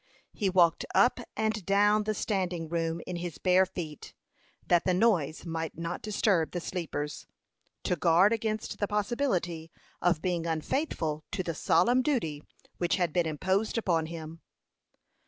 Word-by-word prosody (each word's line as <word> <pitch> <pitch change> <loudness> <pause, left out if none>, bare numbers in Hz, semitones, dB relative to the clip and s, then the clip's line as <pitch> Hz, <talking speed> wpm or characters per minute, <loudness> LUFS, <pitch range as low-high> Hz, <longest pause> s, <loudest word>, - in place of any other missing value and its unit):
He 200 - 0
walked 175 -3 +4
up 245 +1 +4 0.2
and 220 -1 0
down 205 +2 +3
the 215 0 -1
standing 180 -6 -2
room 165 0 -1
in 180 - -4
his 170 -2 -5
bare 185 0 +4
feet, 165 -5 -7 0.5
that 175 -1 +3
the 185 - +2
noise 175 -8 +1
might 165 -2 -4
not 170 +1 -4
disturb 200 -5 +1
the 175 - -1
sleepers, 165 -4 -4 0.6
to 180 - +1
guard 175 +6 +4
against 220 -1 -3
the 205 - 0
possibility 200 - -1 0.3
of 175 -2 +2
being 175 -1 -1
unfaithful 160 - -2
to 185 - -1
the 170 - -3
solemn 245 +10 +3
duty 165 - -1 0.4
which 175 - +2
had 175 -5 0
been 175 -2 +2
imposed 190 +9 0
upon 170 -7 +1
him. 165 0 -8
180 Hz, 150 wpm, -29 LUFS, 165-210 Hz, 0.6 s, walked